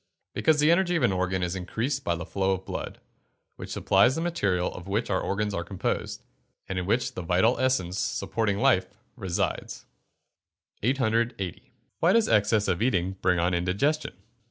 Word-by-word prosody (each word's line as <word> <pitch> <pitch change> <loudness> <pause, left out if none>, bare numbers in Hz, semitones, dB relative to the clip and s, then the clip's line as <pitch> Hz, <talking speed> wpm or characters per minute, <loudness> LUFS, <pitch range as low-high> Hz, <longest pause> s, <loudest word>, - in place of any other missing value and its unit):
_ - - -48 0.3
Because 155 -2 +2
the 150 +2 +5
energy 175 0 +2
of 165 - +1
an 120 - +4
organ 95 0 -1
is 90 +1 -2
increased 115 +9 -2
by 85 - 0
the 85 +2 -6
flow 95 0 0
of 95 0 -5
blood, - - -6 0.6
which - - -9
supplies 100 +7 +3
the 165 - -2
material 100 - 0
of 90 - -9
which 105 +3 -1
our 95 - +1
organs 105 +1 -1
are 85 - -2
composed, 90 +1 -3 0.4
and 95 -1 -2
in 90 - -4
which 120 +4 0
the - - -5
vital 90 +8 +2
essence, 100 -9 0
supporting 100 +1 -1
life, 100 -7 +3 0.3
resides. 95 -8 -3 1.0
880. 115 -5 -1 0.3
_Why 170 +3 +4
does 230 -1 +4
excess 105 0 +3
in 90 - 0
eating 95 -7 +1
bring 90 -1 +2
on 85 +2 +1
indigestion? 100 - 0
100 Hz, 175 wpm, -27 LUFS, 90-130 Hz, 1.0 s, the